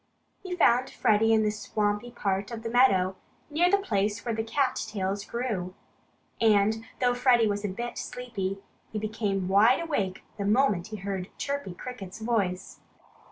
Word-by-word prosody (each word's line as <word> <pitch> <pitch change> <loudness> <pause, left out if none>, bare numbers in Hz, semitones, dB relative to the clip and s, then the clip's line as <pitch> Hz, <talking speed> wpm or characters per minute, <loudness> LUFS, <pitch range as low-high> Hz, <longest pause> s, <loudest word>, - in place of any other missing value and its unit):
He 370 -2 -4
found 255 -6 +4
Freddie 220 +1 +3
in 220 -1 +4
the 210 - +2
swampy 210 +1 -1
part 200 -4 -2
of 230 -2 -7
the 230 - -3
meadow, 190 -7 +4 0.3
near 340 +4 +3
the 400 - +5
place 205 - -1
where 235 - -1
the 220 0 -1
cat 255 +4 0
tails 200 -1 -2
grew. 205 -7 -3 0.7
And 220 0 +3
though 245 -1 +3
Freddie 245 -2 +4
was 205 -1 -1
a - - 0
bit 235 +5 -5
sleepy, 200 -6 -4 0.3
he 220 - -3
became 210 -3 -2
wide 210 +6 +5
awake 245 - -2 0.2
the 200 - -1
moment 210 -4 +2
he 220 - -6
heard 195 -1 -4
Chirpy 280 -10 -3
Cricket's 200 -5 -8
voice. 210 -5 -2
215 Hz, 160 wpm, -28 LUFS, 195-245 Hz, 0.7 s, the